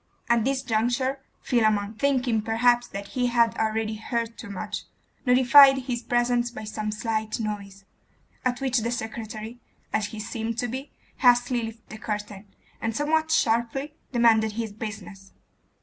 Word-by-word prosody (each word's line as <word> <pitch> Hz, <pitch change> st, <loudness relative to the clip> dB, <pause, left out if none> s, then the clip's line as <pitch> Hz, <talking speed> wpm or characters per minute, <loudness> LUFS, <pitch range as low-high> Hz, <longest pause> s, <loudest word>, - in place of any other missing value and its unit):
At 235 Hz, -1 st, +3 dB
this 270 Hz, 0 st, 0 dB
juncture 245 Hz, +4 st, 0 dB, 0.2 s
Philammon, 215 Hz, -4 st, +2 dB
thinking 250 Hz, -2 st, +1 dB
perhaps 240 Hz, +2 st, +2 dB
that 200 Hz, 0 st, -7 dB
he 250 Hz, -1 st, 0 dB
had 235 Hz, -1 st, +3 dB
already 220 Hz, 0 st, -1 dB
heard 230 Hz, 0 st, -3 dB
too 230 Hz, -, -9 dB
much, 200 Hz, -2 st, -5 dB, 0.4 s
notified 265 Hz, +2 st, +8 dB
his 250 Hz, -2 st, -3 dB
presence 240 Hz, 0 st, +1 dB
by 240 Hz, -, -8 dB
some 215 Hz, 0 st, -4 dB
slight 220 Hz, 0 st, -2 dB
noise, 200 Hz, -3 st, -5 dB, 0.6 s
at 250 Hz, -1 st, 0 dB
which 260 Hz, -2 st, +2 dB
the 230 Hz, +1 st, -2 dB
secretary, 225 Hz, 0 st, -5 dB, 0.3 s
as 215 Hz, -1 st, +1 dB
he 220 Hz, 0 st, -8 dB
seemed 225 Hz, +1 st, -4 dB
to 245 Hz, -, 0 dB
be, 260 Hz, +4 st, -5 dB, 0.3 s
hastily 245 Hz, -1 st, +4 dB
lifted 225 Hz, 0 st, -8 dB
the 215 Hz, -, -8 dB
curtain, 210 Hz, -1 st, -5 dB, 0.3 s
and 225 Hz, -1 st, -2 dB
somewhat 315 Hz, +3 st, +1 dB
sharply 245 Hz, +1 st, +1 dB, 0.2 s
demanded 225 Hz, -3 st, +4 dB
his 220 Hz, -1 st, -4 dB
business. 205 Hz, -2 st, -8 dB
230 Hz, 150 wpm, -26 LUFS, 215-245 Hz, 0.6 s, notified